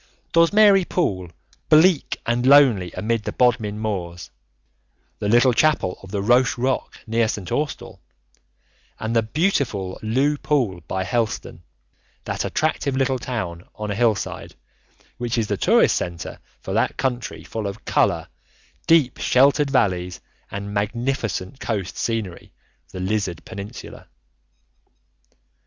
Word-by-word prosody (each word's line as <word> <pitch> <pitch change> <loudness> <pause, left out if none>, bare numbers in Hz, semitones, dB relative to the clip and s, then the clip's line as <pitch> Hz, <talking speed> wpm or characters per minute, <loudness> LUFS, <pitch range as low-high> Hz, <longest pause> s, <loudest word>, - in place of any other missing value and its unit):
Dozmary 195 +3 +5
Pool, 95 - -1 0.4
bleak 160 +1 +4
and 120 +1 0
lonely 130 - +5
amid 110 +4 -1
the - - -3
Bodmin 115 -4 +1
Moors, 90 -6 -4 0.9
the 105 - -1
little 120 +3 +5
chapel 145 -9 +1
on 95 - -12
the 100 0 -2
Roche 125 +4 +3
Rock 130 +2 -1
near 115 0 +1
St. 100 -4 -5
Austell, 150 -1 -3 1.0
and 110 +1 -3
the 115 - +5
beautiful 110 - -1
Looe 135 +7 +1
Pool 120 - 0
by 95 0 -2
Helston, 110 -4 -2 0.6
that - - -3
attractive 150 -3 -1
little 130 -1 +1
town 90 -10 -4
on 105 -1 -4
a - - -2
hillside, 115 -2 -1 0.6
which 120 0 -2
is 115 - +1
the - - -1
tourist - - +3
centre 85 -2 -4 0.2
for - - -5
that - - 0
country 125 -2 -3
full 110 -2 -4
of 100 +2 -8
colour, - - +1 0.6
deep 155 -7 +4
sheltered 140 +3 +3
valleys, 90 -9 0 0.3
and 100 +1 -6
magnificent 115 +1 -2
coast 100 -5 -3
scenery, 110 -7 -3 0.4
the 95 - -7
Lizard 95 -3 -2
peninsula. 100 +2 -9
115 Hz, 125 wpm, -22 LUFS, 100-135 Hz, 1.0 s, Dozmary